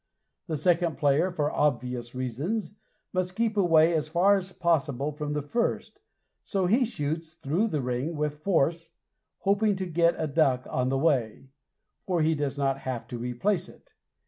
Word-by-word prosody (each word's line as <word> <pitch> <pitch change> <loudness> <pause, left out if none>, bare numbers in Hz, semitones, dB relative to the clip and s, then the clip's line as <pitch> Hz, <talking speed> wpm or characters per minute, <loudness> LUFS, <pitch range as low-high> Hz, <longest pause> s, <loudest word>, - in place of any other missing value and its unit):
The 160 -3 -2
second 170 +2 +1
player, 145 +5 +3
for 150 -5 -1
obvious 125 -4 -1
reasons, 140 - -3 0.4
must 185 0 -1
keep 225 0 0
away 170 -4 +4
as 155 -2 0
far 180 +6 +4
as 190 -1 -3
possible 150 -6 0
from 150 0 -4
the 150 -1 -2
first, 230 +11 -2 0.4
so 195 -3 -1
he 235 +8 +3
shoots 160 -5 -4
through 165 +7 0
the 155 -9 -1
ring 125 +6 -2
with 150 0 -2
force, 165 -1 +1 0.5
hoping 205 +1 +2
to 190 0 -3
get 170 0 +2
a - - -1
duck 135 -4 +2
on 125 0 -1
the 135 - +1
way, 135 -4 0 0.6
for 175 -4 +1
he 160 +1 +3
does 145 -2 -2
not 135 -1 0
have 130 -3 -5
to 120 - -5
replace 160 - -1
it. - - -19
155 Hz, 170 wpm, -27 LUFS, 135-180 Hz, 0.6 s, away